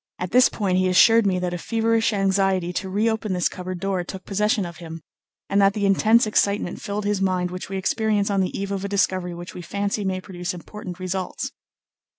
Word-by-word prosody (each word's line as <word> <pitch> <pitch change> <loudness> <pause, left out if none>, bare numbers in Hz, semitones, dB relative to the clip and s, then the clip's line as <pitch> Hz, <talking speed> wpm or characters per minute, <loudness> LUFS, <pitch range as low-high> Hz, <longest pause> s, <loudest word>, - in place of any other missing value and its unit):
At 180 0 -4
this 250 +2 +6
point 185 -4 0
he 185 - +2
assured 225 +4 +5
me 185 -2 +1
that 180 -1 -2
a 175 - -3
feverish 225 +2 +1
anxiety 195 -3 +1
to 190 +2 -3
re 205 +4 +1
open 220 -3 -1
this 180 -1 +1
cupboard 180 0 -6
door 190 -1 -1
took 190 +1 -8
possession 210 0 +1
of 170 -1 -8
him, 165 -2 -9 0.4
and 200 +1 +2
that 195 0 +4
the 205 -1 0
intense 220 +4 +4
excitement 205 -3 0
filled 205 0 -3
his 205 -1 0
mind 185 -2 0
which 185 +1 -6
we 195 - -3
experience 205 +1 0
on 195 -1 +2
the 185 - -2
eve 200 0 -3
of 195 -1 -3
a 200 - -3
discovery 185 -3 0
which 175 +1 -8
we 180 - -7
fancy 200 +4 -2
may 190 -1 -1
produce 180 -1 -5
important 180 0 -8
results. 185 0 -4
195 Hz, 215 wpm, -23 LUFS, 180-205 Hz, 0.4 s, this